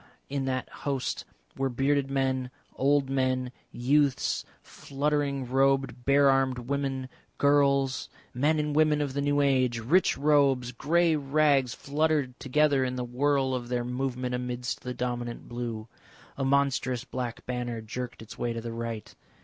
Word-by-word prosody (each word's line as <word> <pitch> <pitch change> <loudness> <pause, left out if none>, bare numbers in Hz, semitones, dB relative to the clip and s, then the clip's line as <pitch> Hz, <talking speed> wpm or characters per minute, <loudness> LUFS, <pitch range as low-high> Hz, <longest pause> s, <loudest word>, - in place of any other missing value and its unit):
In 140 -1 -2
that 130 -1 -2
host 135 -3 -3 0.3
were 135 - 0
bearded 135 +2 +1
men, 130 -2 0 0.3
old 140 0 +2
men, 130 -1 0 0.2
youths, 140 +2 +1 0.2
fluttering 140 -1 -2
robed 135 -1 +1
bare 140 +1 +5
armed 135 -1 +3
women, 135 +1 -2 0.3
girls. 140 -2 +2 0.2
Men 150 +5 +2
and 150 -1 -1
women 155 -1 +4
of 145 -3 -2
the 140 - -1
new 145 0 +2
age! 130 -4 +2
Rich 150 +12 +2
robes, 140 -4 +3
grey 165 +6 +2
rags 140 -3 +2
fluttered 145 -3 0
together 140 0 +2
in 125 0 -2
the 125 - -2
whirl 135 +2 +1
of 120 -1 -3
their 120 -1 -1
movement 125 0 -2
amidst 125 0 -3
the 125 0 -5
dominant 120 -1 -4
blue. 120 -2 -5 0.5
A 135 - -3
monstrous 135 -2 +1
black 125 -3 -5
banner 120 -2 -3
jerked 115 +1 -6
its 110 - -12
way 120 -1 -1
to 115 - -4
the 115 0 -5
right. 115 -2 -5
135 Hz, 150 wpm, -28 LUFS, 125-140 Hz, 0.5 s, bare